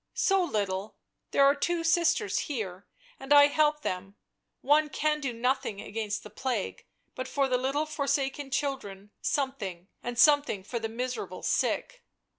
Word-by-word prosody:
" - - -54
So 390 -1 +3
little 200 - -2 0.2
— - - -54
there 275 - +4
are 280 - +6
two 335 +4 -1
sisters 340 +5 +2
here, 200 -8 -4 0.3
and 270 +1 -9
I 290 0 +9
help 300 +1 +2
them; 190 +2 -4 0.5
one 300 +2 +3
can 300 +2 0
do 275 -4 -2
nothing 235 -3 -1
against 215 0 -4
the 210 - -11
plague, 235 -2 -3 0.3
but 255 - -5
for 275 -1 +1
the 250 -1 +1
little 275 +4 0
forsaken 280 -2 -1
children 210 -9 -3
something, 205 -10 -2
and 240 0 -5
something 290 -8 +4
for 235 +4 -4
the 225 0 -3
miserable 250 +2 -4
sick." - - -1
265 Hz, 160 wpm, -29 LUFS, 215-295 Hz, 0.5 s, I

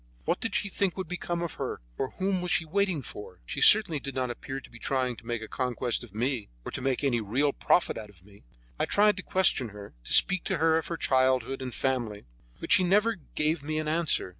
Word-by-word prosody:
What - - 0
did 225 -3 -3
she - - +1
think 195 -1 -1
would 190 - -4
become 175 0 -3
of 170 - -4
her, - - -3 0.2
or 130 - -2
whom 190 -1 0
was 180 - -3
she 165 - +2
waiting 180 -3 0
for? 95 -5 -9
She - - -5
certainly 205 -8 +7
did 135 0 -7
not 130 -2 -1
appear 135 +2 -6
to - - -15
be 120 - -13
trying 130 0 -1
to 115 - -15
make 120 -2 -3
a - - -7
conquest 125 -1 -2
of 105 -4 -14
me, 120 -1 -1 0.2
or - - -5
to - - -5
make 135 +1 -1
any 120 -4 +1
real 135 +8 +1
profit 180 - +1
out 105 - -10
of 95 -3 -19
me. 100 -1 -18 0.4
I - - +2
tried 210 0 +3
to - - -4
question 185 -11 +2
her, 100 0 -11
to - - -7
speak 185 -2 +6
to - - -1
her 160 +1 +3
of - - -7
her 170 - -4
childhood 130 -1 +1
and 130 -1 -4
family; 120 - -2 0.3
but - - -7
she 185 - +6
never 210 +5 +3 0.2
gave 155 +1 +1
me 155 +2 -3
an 155 0 -2
answer. 160 - +2
135 Hz, 240 wpm, -28 LUFS, 120-175 Hz, 0.4 s, certainly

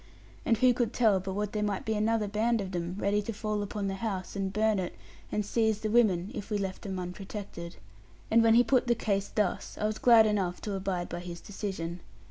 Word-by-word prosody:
And 230 - +4
who 250 +2 +5
could 240 -2 -1
tell 215 -5 +4
but 190 +1 -4
what 205 +1 -2
there 210 - -1
might 205 -2 -1
be 220 - 0
another 215 0 +1
band 225 +3 +1
of 195 -2 -4
them, 175 0 -3
ready 205 +1 +1
to 210 - -4
fall 210 -1 -2
upon 205 0 -3
the 195 - -1
house, 195 -5 -3
and 195 -1 -1
burn 215 0 +2
it, 180 -1 -4 0.4
and 210 -1 -1
seize 220 -1 +1
the 215 - -1
women, 205 -5 +3
if 205 - -6
we 210 - 0
left 190 -2 -3
them 195 -2 -4
unprotected? 180 -1 -6 0.5
When 225 0 +5
he 240 - +7
put 255 -1 +2
the 240 - +3
case 200 -3 -1
thus, 210 -4 -1
I 210 - 0
was 215 0 -1
glad 230 -3 +7
enough 195 -4 0
to 205 - -3
abide 190 -2 -2
by 175 - -5
his 175 -1 -7
decision. 185 -4 -5
205 Hz, 225 wpm, -29 LUFS, 190-220 Hz, 0.5 s, he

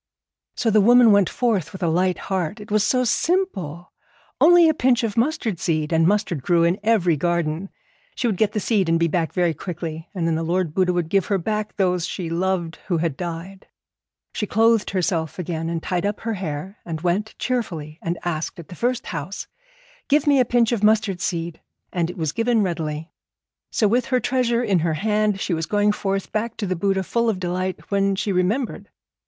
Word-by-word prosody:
So 225 - +1
the 215 0 +5
woman 240 +1 +7
went 200 -3 +4
forth 205 -10 0
with 190 - -7
a - - +2
light 180 +3 +1
heart. 190 +2 -3
It 210 0 -11
was 210 -1 +3
so 255 +3 +2
simple, 230 - -1 0.5
only 345 0 +7
a 315 - +4
pinch 255 -4 +2
of 220 -3 -1
mustard 230 - 0
seed, 155 -1 -1
and 165 0 +4
mustard 200 -6 0
grew 170 +4 +2
in 170 +4 +2
every 205 -6 +3
garden. 170 +2 -1 0.5
She - - -2
would 225 -4 +1
get 210 0 +1
the 215 - 0
seed 200 -5 +1
and 165 0 +3
be 170 - +3
back 165 0 -1
very 175 -3 +1
quickly, 165 0 -6
and 175 -3 -1
then 165 - +1
the 160 - -1
Lord 170 -1 -1
Buddha 185 0 +2
would 175 -2 -1
give 195 +2 +1
her 200 - +1
back 210 +3 -3
those 180 -3 +1
she 170 -4 -4
loved 175 -1 -1
who 175 - +1
had 160 -3 -1
died. 175 +3 -6 0.7
She 210 - -2
clothed 225 +1 +3
herself 175 -4 -1
again 165 -2 -3
and 165 -1 -3
tied 180 -1 -1
up 205 - -4
her 225 0 -2
hair, 185 +1 -5
and 160 -2 -5
went 185 +5 -1
cheerfully 170 -11 -3
and 170 +1 -2
asked 165 -2 -3
at 170 -3 -11
the - - -8
first 245 +5 -1
house, 165 +4 -5 0.6
'Give 295 +1 +3
me 285 -2 +4
a 250 - +4
pinch 235 -1 +2
of 225 -3 -1
mustard 210 -4 +2
seed,' 170 -3 -3 0.3
and 175 -2 0
it 180 - -8
was 160 -3 -1
given 230 +2 +1
readily. 160 -3 -3 0.6
So 215 - +2
with 240 +4 +2
her 255 -1 +1
treasure 245 -2 +1
in 200 -6 +2
her 160 -1 0
hand 210 +2 +1
she 190 - -1
was 160 -1 -2
going 205 0 +2
forth 195 -1 -2
back 225 +1 -2
to 210 - -2
the 185 -1 -1
Buddha 190 +2 0
full 235 +4 0
of 200 -4 -1
delight, 185 +2 -3
when 195 0 +2
she 200 +1 -1
remembered. 200 +8 -1
190 Hz, 205 wpm, -22 LUFS, 170-215 Hz, 0.7 s, woman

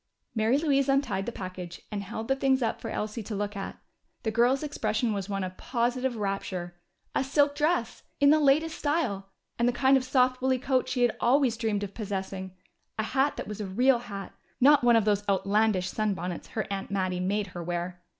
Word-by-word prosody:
Mary 225 +3 +2
Louise 280 -3 +2
untied 240 -8 +1
the - - -1
package 185 -4 -7
and 205 -1 -3
held 220 +3 -6
the 270 - +2
things 270 -1 +2
up 225 - -1
for 225 - -5
Elsie 215 +2 -3
to 215 0 -5
look 205 +1 -3
at. 195 - -5 0.5
The 220 - 0
girl's 250 +5 +3
expression 225 -5 -1
was 200 -1 -4
one 195 -1 -2
of 185 0 -6
positive 250 +1 -1
rapture. 195 -4 -3 0.4
A - - +1
silk 285 +1 +2
dress! 295 -5 0 0.2
In 285 0 +6
the 310 - +5
latest 305 +3 +2
style! 255 -11 -1 0.3
And 235 - +3
the - - +4
kind 265 +2 +4
of 260 - -1
soft 255 -1 +2
wooly 260 0 +2
coat 255 0 0
she 250 -1 +1
had 240 - +2
always 255 -1 +3
dreamed 220 -3 -1
of 200 -1 -6
possessing! 190 -3 -5 0.4
A 220 - 0
hat 270 +5 +1
that - - -5
was 210 0 -5
a 205 - -3
real 245 +6 +3
hat 200 -4 -7 0.3
not 285 +1 +6
one 240 -1 +6
of 225 -2 +3
those 205 -1 +2
outlandish 200 -1 +2
sunbonnets 185 -5 -2
her 220 - -1
aunt 195 -1 -3
Mattie 185 -2 -1
made 200 +3 0
her 175 - -5
wear! 175 +1 -4
220 Hz, 205 wpm, -28 LUFS, 195-265 Hz, 0.5 s, In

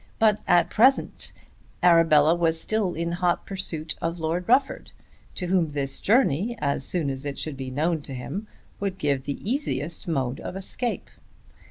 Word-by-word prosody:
But, 215 -2 +3
at 175 -1 +4
the - - -17
present 260 +5 +2
moment, - - -28
Arabella 160 -2 +5
was 165 -1 +1
still 210 -1 -1 0.2
hot 175 0 +1
in - - -31
pursuit 165 -5 -2
of 165 +1 -2
Lord 170 +3 -2
Rufford; 265 +3 +2 0.5
to 180 - -4
whom 175 -4 +1
this 140 -2 -1
journey, 230 - +2
as 140 -2 -1
soon 155 -2 0
as 135 +1 -3
it 145 -1 -4
should 155 -3 -4
be 130 -1 -6
known 155 +4 0
to 135 -2 -8
him, 195 - -5 0.3
would 195 -2 -3
give 140 -6 -1
the 140 - -3
easiest 215 - -2
mode 135 -6 -1
of - - -6
escape! 230 +5 -3
165 Hz, 175 wpm, -25 LUFS, 145-195 Hz, 0.5 s, Arabella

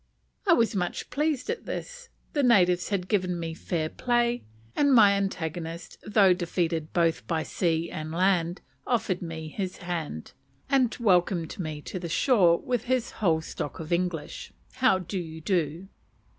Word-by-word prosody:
I 350 - +7
was 230 -7 +3
much 180 -2 -3
pleased 300 -2 0
at 470 - -6
this; - - -6 0.2
the 290 - +2
natives 180 -8 +4
had 185 -3 -1
given 185 -4 0
me 165 -1 -4
fair 160 -1 -2
play, 240 +5 0 0.3
and 285 -2 +4
my 210 -4 +8
antagonist, 170 -4 -4
though 205 -3 +5
defeated 170 -3 -2
both 165 -2 +1
by 160 -2 0
sea 165 -2 -1
and 155 0 -5
land, 175 0 +1 0.3
offered 215 -7 0
me 160 -2 -5
his 185 +2 -4
hand, 165 - -5 0.3
and 260 -4 +2
welcomed 180 -3 +2
me 155 -4 -4
to 185 - -5
the 170 -1 -5
shore 180 - +4
with 245 +2 -2
his 255 -1 0
whole 165 -5 +3
stock 145 - -6
of 165 +1 -3
English 170 -3 -2 0.3
"How 255 -7 +4
do 185 +1 -4
you 160 -2 -7
do?" 170 0 -1
180 Hz, 155 wpm, -27 LUFS, 165-220 Hz, 0.3 s, my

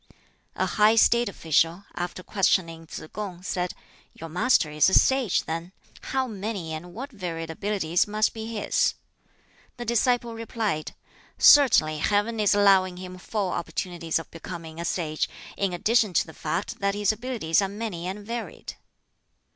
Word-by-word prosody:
A - - 0
high 215 +1 +4
State 235 0 +4
official, 165 +1 +1
after 180 +1 -5
questioning 165 -5 0
Tsz - - -7
kung, 190 -4 -6
said, 180 -1 -2 0.4
"Your 165 - -8
Master 180 -2 +2
is 150 +4 +4
a - - +3
sage, 265 -7 +3
then? 165 +3 -5 0.3
How 265 0 0
many 200 -7 -5
and 175 +3 -8
what 270 +4 -6
varied 165 -6 -5
abilities 180 -1 0
must 215 +1 +1
be 220 -1 -6
his!" 225 -3 0 0.8
The 240 - -5
disciple 235 0 +1
replied, 225 -8 -3 0.4
"Certainly 155 - +6
Heaven 210 +6 +1
is 210 -1 +3
allowing 190 -3 +4
him 185 0 -8
full 200 0 -2
opportunities 170 -1 -2
of 165 - -7
becoming 165 -1 -8
a - - -4
sage, 155 -4 -1 0.3
in 195 -2 0
addition 215 +3 +2
to - - +3
the 160 - -12
fact 165 +6 -3
that 200 0 0
his 205 0 +2
abilities 215 -7 0
are 195 - -1
many 200 -4 -5
and 200 +2 -6
varied." 235 +1 -6
190 Hz, 155 wpm, -26 LUFS, 170-220 Hz, 0.8 s, Certainly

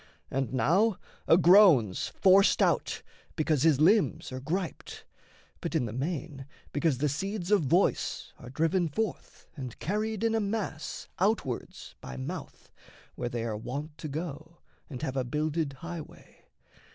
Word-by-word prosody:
And 135 -1 -1
now 185 - +2 0.3
A 165 - +7
groan's 170 - +6
forced 195 +1 +4
out, - - 0 0.3
because 155 -3 +1
his 155 -3 +4
limbs 170 -2 +3
are 130 - -5
griped, 170 +6 -4 0.5
But, 170 - -4
in 145 -6 +2
the 110 - -5
main, 145 0 -4 0.3
because 145 -2 +1
the 150 +4 +1
seeds 190 +6 -3
of 210 - +5
voice 170 +7 +1
Are 120 - -10
driven 165 +6 +1
forth 200 +5 -4
and 130 -5 -7
carried 215 +4 -2
in 225 -1 +2
a 225 - +2
mass 200 -7 -3
Outwards 185 - -1
by 65 -1 -8
mouth, 65 - -7 0.4
where 120 - -4
they 120 -1 -3
are 115 -2 -2
wont 145 +8 -5
to 155 - -5
go, 155 +2 -6 0.3
And 135 -1 -7
have 135 -4 -2
a 130 - +1
builded 150 +3 -1
highway. 165 +3 -10
155 Hz, 150 wpm, -29 LUFS, 135-185 Hz, 0.5 s, A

